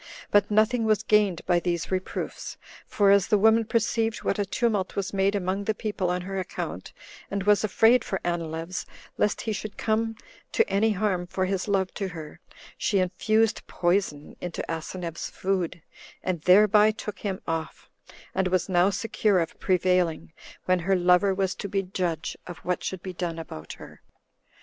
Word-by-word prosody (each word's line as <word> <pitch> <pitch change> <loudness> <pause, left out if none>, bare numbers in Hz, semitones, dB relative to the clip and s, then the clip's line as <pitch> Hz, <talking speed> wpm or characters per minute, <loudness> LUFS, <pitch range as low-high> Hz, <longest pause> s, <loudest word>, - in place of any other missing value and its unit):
But 205 -1 +4
nothing 220 +2 +3
was 215 -1 +2
gained 210 -5 +2
by 175 -1 +3
these 170 -1 -2
reproofs; 185 0 -4 0.3
for 200 -1 +3
as 200 -1 +4
the 210 - +4
woman 220 +2 +4
perceived 225 0 0
what 200 - 0
a 200 - 0
tumult 210 -4 0
was 200 -1 -2
made 195 +1 +2
among 195 +1 -1
the 220 - 0
people 205 -5 -2
on 180 0 -1
her 195 +1 -4
account, 185 - -5 0.4
and 200 -1 -2
was 205 +1 +4
afraid 225 +4 +4
for 190 - -3
Anileus, 165 +1 -3 0.3
lest 210 - +1
he 220 - -2
should 210 0 -6
come 225 +1 0 0.4
to 455 - +3
any 210 +3 +2
harm 185 -3 -1
for 185 0 -1
his 190 +1 -2
love 195 -2 0
to 195 - -3
her, 160 -2 -9 0.4
she 205 - +1
infused 215 +4 +1
poison 175 -5 -1
into 175 -1 -4
Asineus's 165 +1 -5
food, 185 -4 -2 0.4
and 180 -4 -2
thereby 210 +4 +6
took 210 -2 -5
him 195 -3 -3
off, 165 -1 -4 0.5
and 190 0 +1
was 185 -1 +1
now 180 0 +4
secure 205 -1 +1
of 165 -1 -3
prevailing, 180 -3 +1 0.3
when 185 0 +3
her 190 +3 +1
lover 180 +2 +4
was 190 -1 0
to 200 - -6
be 195 0 0
judge 180 -3 -3
of 175 -2 -7
what 180 0 -1
should 190 -2 -4
be 185 - -5
done 175 -2 -3
about 80 - -8
her. - - -13
190 Hz, 175 wpm, -26 LUFS, 180-210 Hz, 0.5 s, thereby